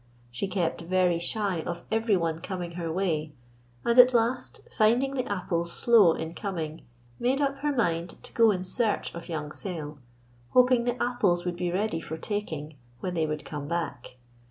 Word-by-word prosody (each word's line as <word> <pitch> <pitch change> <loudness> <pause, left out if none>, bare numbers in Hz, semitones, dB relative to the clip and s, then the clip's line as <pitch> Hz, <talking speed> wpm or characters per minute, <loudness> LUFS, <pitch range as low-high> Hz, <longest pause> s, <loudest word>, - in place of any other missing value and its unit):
She 125 +11 -2
kept 180 -3 -1
very 180 0 +2
shy 190 -1 -1
of 170 +1 -5
everyone 190 -8 +1
coming 180 -2 -4
her 170 -1 -4
way, 160 -4 -1 0.5
and 235 +1 +4
at 250 0 +8
last, 235 +2 0
finding 240 +5 +3
the 255 -5 -2
apples 170 -3 -1
slow 220 -8 +6
in 160 0 -5
coming, 165 -5 -5 0.3
made 260 +3 +1
up 275 -1 0
her 295 +2 0
mind 175 -10 0
to - - -11
go 230 -1 +5
in 185 -3 0
search 215 +3 0
of 170 +1 -8
young 150 -2 -4
Sayle, 155 -5 -5 0.5
hoping 250 -1 +5
the 245 0 -1
apples 205 -8 +1
would 175 -1 -1
be 175 -1 -1
ready 195 -1 0
for 160 0 -6
taking 160 -6 -4 0.2
when 180 - -3
they 160 -2 0
would 150 0 -4
come 145 -2 -5
back. 165 -7 -4
180 Hz, 175 wpm, -27 LUFS, 165-225 Hz, 0.5 s, at